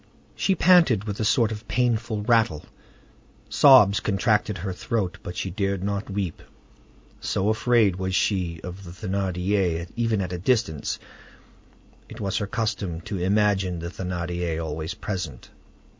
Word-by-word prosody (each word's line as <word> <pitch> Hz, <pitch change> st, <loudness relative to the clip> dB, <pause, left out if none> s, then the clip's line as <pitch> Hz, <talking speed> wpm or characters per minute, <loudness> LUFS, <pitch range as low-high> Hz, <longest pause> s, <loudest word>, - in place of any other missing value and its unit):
She 190 Hz, -, +1 dB
panted 165 Hz, -, +5 dB
with 105 Hz, -1 st, -5 dB
a -, -, 0 dB
sort 110 Hz, +1 st, +3 dB
of 105 Hz, -1 st, -7 dB
painful 115 Hz, -1 st, 0 dB
rattle; 110 Hz, -9 st, +2 dB, 0.8 s
sobs 125 Hz, -8 st, +7 dB
contracted 105 Hz, 0 st, +1 dB
her 95 Hz, +2 st, -4 dB
throat, 95 Hz, -1 st, -2 dB
but 90 Hz, -, -7 dB
she 95 Hz, -, -3 dB
dared 100 Hz, 0 st, -1 dB
not 100 Hz, +1 st, -2 dB
weep, 95 Hz, -5 st, -3 dB, 0.8 s
so 100 Hz, +3 st, 0 dB
afraid 110 Hz, -3 st, +3 dB
was 95 Hz, 0 st, -2 dB
she 90 Hz, -5 st, 0 dB
of 90 Hz, +2 st, -8 dB
the 90 Hz, -, -10 dB
Thénardier, 95 Hz, -1 st, -1 dB
even 115 Hz, -3 st, 0 dB
at 90 Hz, -1 st, -4 dB
a 90 Hz, -, -4 dB
distance: 105 Hz, -, 0 dB, 1.1 s
it -, -, -10 dB
was 100 Hz, -2 st, -1 dB
her 100 Hz, -, -2 dB
custom 100 Hz, -6 st, -2 dB
to 100 Hz, 0 st, -5 dB
imagine 95 Hz, -1 st, +1 dB
the 85 Hz, +1 st, -5 dB
Thénardier 85 Hz, -2 st, -3 dB
always 80 Hz, +2 st, -4 dB
present. 85 Hz, -, -5 dB
100 Hz, 145 wpm, -25 LUFS, 90-110 Hz, 1.1 s, sobs